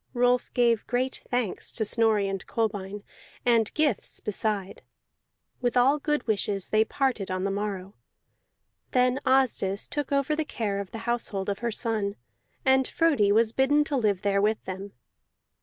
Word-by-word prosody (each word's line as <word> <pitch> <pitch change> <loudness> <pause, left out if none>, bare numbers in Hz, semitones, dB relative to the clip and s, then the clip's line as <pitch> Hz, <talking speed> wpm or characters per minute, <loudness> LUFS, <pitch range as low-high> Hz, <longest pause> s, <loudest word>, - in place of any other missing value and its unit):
Rolf 245 0 +2
gave 235 -3 +2
great 255 +2 -1
thanks 245 -6 -1
to 220 - -1
Snorri 215 -2 +3
and 195 -1 -3
Kolbein, 205 -3 -2 0.4
and 230 -3 +3
gifts 305 -2 +1
beside; 210 -2 -2 0.8
with 245 0 0
all 270 +4 +4
good 295 -2 -1
wishes 205 -3 -1
they 215 0 +4
parted 245 -4 -1
on 185 0 -2
the 195 - 0
morrow. 200 -1 -4 1.0
Then 250 +1 +3
Asdis 245 -7 +2
took 290 -1 -3
over 280 +2 +1
the 315 - 0
care 215 -9 -3
of 200 -2 -5
the 225 0 -8
household 225 -5 -1
of 200 - -2
her 235 0 -1
son, 215 -3 -1 0.5
and 265 0 +4
Frodi 285 -12 +2
was 220 +1 +3
bidden 290 +4 +3
to 295 -1 -3
live 210 -7 +1
there 200 -1 +2
with 215 +1 0
them. 190 +2 -6
225 Hz, 155 wpm, -27 LUFS, 200-255 Hz, 1.0 s, all